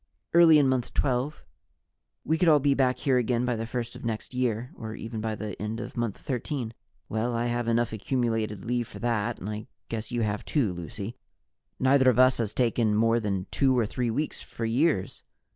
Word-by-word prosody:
"Early 165 -2 +8
in 145 -2 +4
Month 130 -2 -1
Twelve. 135 +2 0 0.8
We 160 +1 +1
could 175 -2 +5
all 150 - +7
be 140 0 +3
back 130 -2 +2
here 130 -1 +2
again 120 0 +1
by 120 -1 0
the 115 0 -4
first 120 -1 -4
of - - -10
next 115 +1 -4
year, 125 -1 -1
or 110 -1 -7
even 115 -1 -5
by 110 0 -2
the 105 0 -5
end 110 +2 -3
of - - -7
Month 120 -4 -2
Thirteen." 125 -3 -3 0.3
"Well, 115 +2 -1
I 115 +1 0
have 120 0 -1
enough 115 0 +1
accumulated 110 -3 -1
leave 120 0 -1
for - - -10
that 115 -4 -1
and 95 - -7
I 105 0 -5 0.2
guess 110 -1 -4
you 120 -1 0
have 105 0 -1
too, 120 - 0
Lucy; 105 +6 -6 0.6
neither 130 0 +5
of 120 - +2
us 130 0 +5
has 110 -3 -1
taken 115 -3 +1
more 115 +2 +3
than 100 -4 -2
two 130 -2 +3
or 120 - +3
three 120 +3 -2
weeks 145 +7 -2
for 115 - -5
years. 120 - +1
120 Hz, 205 wpm, -27 LUFS, 110-130 Hz, 0.8 s, Early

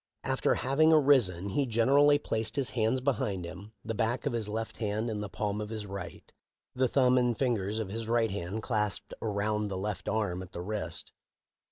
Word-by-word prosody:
After - - +1
having 140 +6 +3
arisen, 125 - +4
he 135 +7 0
generally 140 +6 +5
placed 115 -6 -3
his 135 -2 -1
hands 120 +1 +1
behind 105 -9 -1
him, 95 +5 -9
the 115 - -2
back 115 +2 -1
of - - 0
his 110 -3 -1
left 110 +1 -4
hand 110 +1 -1
in 105 -1 -3
the 105 - -4
palm 105 +2 -2
of 105 - -5
his 110 -2 -4
right, 100 -2 -7 0.5
the 130 0 +2
thumb 125 0 +4
and 120 -2 +1
fingers 110 -5 0
of 110 -4 -3
his 110 +2 -4
right 115 -2 +2
hand 100 +3 -4
clasped 105 -4 -1
around 105 0 -1
the 95 -2 -4
left 95 -1 -3
arm 105 -4 -1
at 95 0 -10
the 85 - -5
wrist. 100 -5 -3
110 Hz, 195 wpm, -30 LUFS, 100-125 Hz, 0.5 s, generally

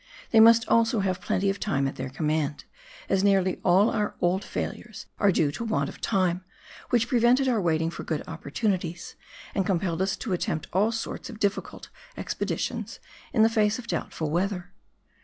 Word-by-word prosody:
They 225 - +6
must 225 0 +7
also 230 -1 +3
have 185 -1 -1
plenty 195 +1 +1
of 195 - -6
time 140 -9 0
at 135 - -5
their 130 - -5
command, 150 +1 -1 0.4
as 195 0 +1
nearly 190 -2 +2
all 190 +4 +4
our 210 -1 -1
old 180 +3 +1
failures - - -5
are 200 -2 +4
due 150 -5 +2
to 230 - -5
want 220 -1 0
of - - -12
time, 185 -3 +1 0.5
which 230 -2 +2
prevented 250 +2 +3
our 235 -5 +2
waiting 165 -1 +1
for - - -7
good 155 -2 -3
opportunities, 170 +2 -3 0.4
and 195 - +1
compelled 180 -2 -1
us 190 +2 +1
to 215 - -3
attempt 160 -3 -2
all 205 +5 +3
sorts 225 0 -5
of 225 -3 -9
difiicult 200 -1 -2 0.3
expeditions - - -3 0.3
in 220 - +4
the - - +7
face 215 -1 +2
of 250 - -8
doubtful 160 -8 -3
weather. 180 +1 -2
195 Hz, 175 wpm, -26 LUFS, 170-220 Hz, 0.5 s, must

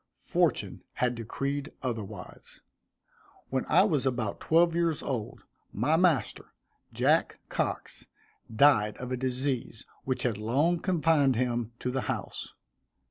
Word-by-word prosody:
Fortune - - 0
had 125 -1 0
decreed 140 +5 -4
otherwise. 115 -6 -6 0.9
When 130 0 -1
I 180 +4 +5
was 155 -10 +1
about 120 -4 -2
twelve 170 +1 +3
years 170 -3 0
old, 125 -1 -4 0.3
my 135 +10 +1
master, 165 - +1 0.4
Jack - - +2
Cox, - - -3 0.4
died 110 -3 +4
of 125 0 -6
a - - +1
disease 130 -2 -2 0.2
which 130 -1 -2
had 115 -5 0
long 145 +11 +1
confined 160 -7 +3
him 120 -1 -1
to 125 - -1
the 130 +1 -1
house. - - -4
130 Hz, 125 wpm, -29 LUFS, 120-155 Hz, 0.9 s, I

